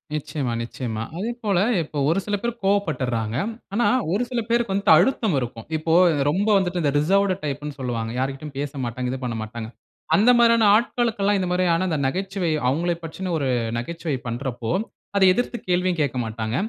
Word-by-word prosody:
நிச்சயமா, 150 -4 -3
நிச்சயமா. 115 -2 -5 0.2
அதே 215 +6 -2
போல 200 -4 +2 0.2
இப்போ 150 -1 -8
ஒரு 170 +4 +2
சில 205 - 0
பேர் 235 - -1
கோவப்பட்டறாங்க. 130 - 0 0.4
ஆனா 235 +4 +2 0.3
ஒரு 205 +6 +1
சில 245 -2 -1
பேருக்கு 235 -3 +1
வந்துட்டு, 200 -4 +4
அழுத்தம் 210 - +2
இருக்கும். 120 -3 -6
இப்போ 160 +1 -1 0.4
ரொம்ப 195 +7 0
வந்துட்டு 180 -2 0
இந்த 145 -3 +2
ரிசர்வ்டு 195 +5 +2
டைப்ன்னு 145 0 -4
சொல்லுவாங்க. 115 -3 -3
யார்கிட்டயும் 135 +2 -4
பேசமாட்டாங்க, 130 -3 -3
இது 130 - -4
பண்ணமாட்டாங்க. 110 -1 -5 0.5
அந்த 220 +5 +5
மாதிரியான 230 -2 +5
ஆட்களுக்கெல்லாம், 220 -3 +1
இந்த 185 - -1
மாரியான 180 0 +2 0.2
நகைச்சுவை 190 +2 -2 0.2
அவங்களை 170 +6 0
பற்றின, 180 +3 -5
ஒரு 135 -2 -1 0.3
நகைச்சுவை 165 +2 -3
பண்றப்போ 120 -1 -3 0.5
அதை 195 - +5
எதிர்த்து 245 +3 -2
கேள்வியும் 180 -1 +1
கேட்க 135 -3 -1
மாட்டாங்க. 110 0 -3
160 Hz, 155 wpm, -23 LUFS, 130-195 Hz, 0.5 s, அந்த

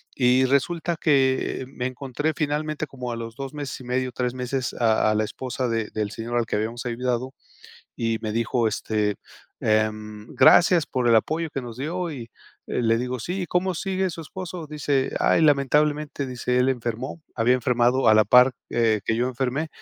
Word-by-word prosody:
Y 125 0 +4
resulta 165 +5 0
que 135 -4 +1
me 125 -2 -5
encontré 135 +4 -3
finalmente, 155 0 -2
como 125 -3 -6
a - - -3
los 115 0 -7
2 135 +1 -6
meses 145 -3 -5
y - - -11
medio, 125 +1 -1
3 125 0 -2
meses, 125 0 -3
a 110 -2 +2
a - - +1
la 110 - +2
esposa 130 +3 -3
de 115 -1 -1
del 105 -1 -2
señor 120 +2 -3
al 115 - +1
que - - -2
habíamos 115 +3 -3
ayudado, 125 +2 -2 0.6
y 115 -1 -1
me 110 - -2
dijo, 115 +1 0
este, 105 -1 -1 0.4
em: 110 0 -1
"Gracias 170 -4 +6
por 125 -2 0
el 115 - +6
apoyo 160 +8 0
que 135 - -4
nos 120 -2 -8
dio", 170 +6 -3
y 115 -5 -8 0.4
eh, 125 - -1
le 115 0 +3
digo: 125 +1 -3
"Sí, 180 +8 -3
¿cómo 180 +1 0
sigue 190 +1 -1
su 165 - -7
esposo?", 175 +1 -7
dice: 145 -3 0
"Ay, - - +3
lamentablemente, 150 0 +2
dice, 125 0 -1
él 125 +1 +3
enfermó". 125 +4 -3
Había 125 +2 +3
enfermado 125 0 +2
a 110 - +7
la 110 0 +5
par, 125 +4 +6 0.2
eh, 110 -3 +2
que 115 - 0
yo 120 - +1
enfermé, 130 +5 -2
125 Hz, 190 wpm, -24 LUFS, 115-145 Hz, 0.6 s, a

